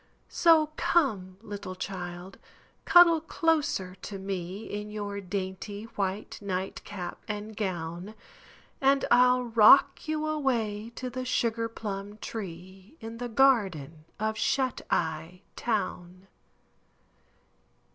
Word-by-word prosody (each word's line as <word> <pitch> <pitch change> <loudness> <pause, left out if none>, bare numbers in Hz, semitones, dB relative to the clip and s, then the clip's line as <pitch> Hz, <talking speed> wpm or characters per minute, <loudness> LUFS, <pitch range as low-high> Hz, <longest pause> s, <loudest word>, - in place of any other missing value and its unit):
So 320 -3 +4
come, 200 - +1
little 200 -3 -6
child, 180 0 -6 0.5
cuddle 340 -2 +7
closer 305 - 0
to 200 - -6
me 190 +1 -5
In 210 +1 -5
your 205 -1 -5
dainty 195 +2 -5
white 195 +1 -3
nightcap 190 -1 -5
and 210 0 -5
gown, 180 0 -4 0.7
And 275 0 +3
I'll 250 0 +5
rock 230 +6 +6
you 310 0 -1
away 235 -8 -1
to 255 -1 -5
the 255 +1 -4
Sugar 230 -2 0
Plum 205 -2 -6
Tree 190 - -8
In 225 0 -8
the 245 0 -4
garden 195 - +2
of 220 0 -1
Shut 260 -2 0
Eye 165 +2 -2
Town. 185 -4 -3
210 Hz, 105 wpm, -28 LUFS, 185-245 Hz, 0.7 s, cuddle